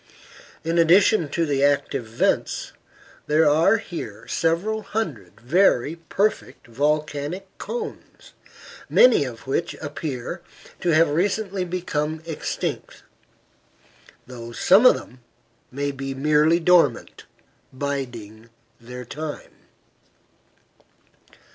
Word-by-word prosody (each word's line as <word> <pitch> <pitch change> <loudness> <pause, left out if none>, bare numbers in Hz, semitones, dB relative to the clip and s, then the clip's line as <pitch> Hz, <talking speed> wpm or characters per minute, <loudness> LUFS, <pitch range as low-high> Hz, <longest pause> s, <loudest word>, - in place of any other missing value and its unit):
In 165 +1 0
addition 175 0 +4
to 165 +3 0
the 140 -2 0
active 145 -4 +1
vents, 115 - -1 0.5
there 155 +1 +4
are 165 +9 +4
here 180 -6 -8
several 185 +7 0
hundred 145 - -5
very 155 - +2
perfect 195 +6 -2
volcanic 150 +6 -2
cones, 455 -2 -7 0.6
many 245 - +5
of 120 -3 -9
which 150 +6 -2
appear 145 +1 -5 0.4
to 175 - -1
have 160 -1 +4
recently 195 +3 0
become 160 -3 -3
extinct, 160 -2 -5 1.2
though 120 -2 -9
some 195 - +5
of - - +6
them 125 - -10 0.5
may 140 +2 -3
be 135 0 -5
merely 150 +4 +3
dormant, 165 -7 +2 0.5
biding 120 -5 -5 0.3
their 125 +1 -9
time. 150 +4 -7
150 Hz, 95 wpm, -23 LUFS, 135-175 Hz, 1.2 s, of